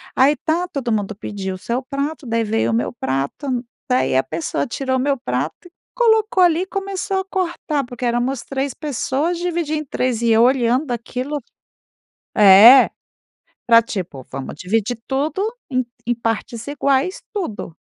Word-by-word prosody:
Aí, 280 +3 +4
tá, 340 +3 -1
todo 255 -5 -3
mundo 210 -1 -1
pediu 195 -2 -5
o - - -8
seu 235 +6 -3
prato, 280 +2 -4
daí 230 -1 0
veio 225 +1 0
o - - -1
meu 235 - 0
prato, 240 - -2 0.2
daí 250 - +2
a 130 - +4
pessoa 165 - -2
tirou 260 +1 -2
o - - -1
meu 275 +1 +1
prato 275 +6 -3
e - - -21 0.2
colocou 445 -4 +3
ali 345 0 +4
e - - -2
começou 390 0 -3
a 380 - -4
cortar 345 -6 -2
porque 245 0 -6
éramos 240 +2 0
3 270 -1 -3
pessoas 300 +3 -2
dividir 340 -3 -1
em 305 - -3
3 250 -3 -1
e 235 - +2
eu 225 +1 +5
olhando 250 +1 +2
aquilo. 250 +5 -3 1.0
É, 215 +6 +9 0.8
pra 230 -1 +7
tipo: 180 - -6
"Vamos 135 0 -6
dividir 220 +6 -1
tudo 285 +6 -1 0.3
em 255 -1 0 0.2
em 240 - +1
partes 230 +1 -3
iguais, 280 +5 0
tudo.". 220 - -5
255 Hz, 165 wpm, -20 LUFS, 230-305 Hz, 1.0 s, É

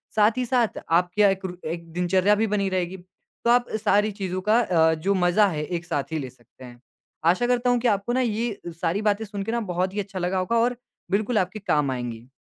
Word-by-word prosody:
साथ 215 0 +5
ही 255 - +1
साथ 240 -2 +1
आपकी 175 +2 +2
क्या 205 - +7
एक 195 0 -2
रू 180 -1 -5 0.2
एक 170 -1 -7
दिनचर्या 185 +3 +2
भी 220 +2 +1
बनी 205 -1 0
रहेगी, 185 0 -2
तो 185 +5 -8
आप 245 0 +4
अ, - - -2
सारी 210 0 +2
चीज़ों 190 -2 -4
का 225 +2 +5
अ, 160 -7 +3
जो 180 +6 0
मज़ा 185 +3 +3
है 155 -5 -2
एक 175 +1 -4
साथ 145 -4 -3
ही 160 - -1
ले 130 -3 -5
सकते 125 +1 -17
हैं। 120 -1 -13 0.5
आशा 215 +7 0
करता 245 0 +1
हूँ 245 0 +3
कि 245 - 0
आपको 205 +2 0
ना 260 - +2
ये 230 -2 -1 0.2
सारी 180 +4 0
बातें 210 +1 +1
सुनके 205 +1 -4
ना 235 - 0
बहुत 185 +2 -1
ही 210 - -3
अच्छा 195 -1 -5
लगा 180 +2 -1
होगा 185 +6 -1
और 240 +1 +1 0.3
बिल्कुल 215 +4 +1
आपके 185 +2 -1
काम 150 -8 +1
आएँगी। 120 -2 -5
195 Hz, 235 wpm, -24 LUFS, 175-220 Hz, 0.5 s, क्या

